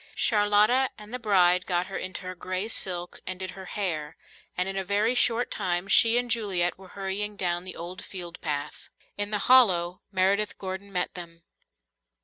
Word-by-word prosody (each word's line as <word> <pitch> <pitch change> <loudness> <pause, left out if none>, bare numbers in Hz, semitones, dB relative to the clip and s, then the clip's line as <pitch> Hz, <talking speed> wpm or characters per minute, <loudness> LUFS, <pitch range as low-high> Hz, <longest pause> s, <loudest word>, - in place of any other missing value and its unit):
Charlotta 210 +4 +3
and 210 +2 -12
the 250 - -3
bride 185 -5 +3
got 180 -1 +1
her 195 - -8
into 185 +1 -5
her 185 0 -5
grey 185 +3 -3
silk 180 -5 -3
and 185 0 -4
did 185 -1 -4
her 190 0 -10
hair, 165 -7 -3 0.4
and 180 +1 +1
in 195 - -4
a 195 - -1
very 205 +5 +1
short 245 -1 +1
time 175 +1 -1
she 225 +3 +5
and 245 -1 -1
Juliet 190 -7 +1
were 190 0 -14
hurrying 200 +2 -2
down 175 -2 -1
the 185 - -5
old 180 +3 -7
field 175 -3 -7
path. 145 -2 -4 0.3
In 205 0 -1
the 210 - 0
hollow 180 -9 +5
Meredith 200 +2 +1
Gordon 190 +1 -6
met 180 -2 -1
them. 170 -2 -9
190 Hz, 180 wpm, -27 LUFS, 180-210 Hz, 0.4 s, she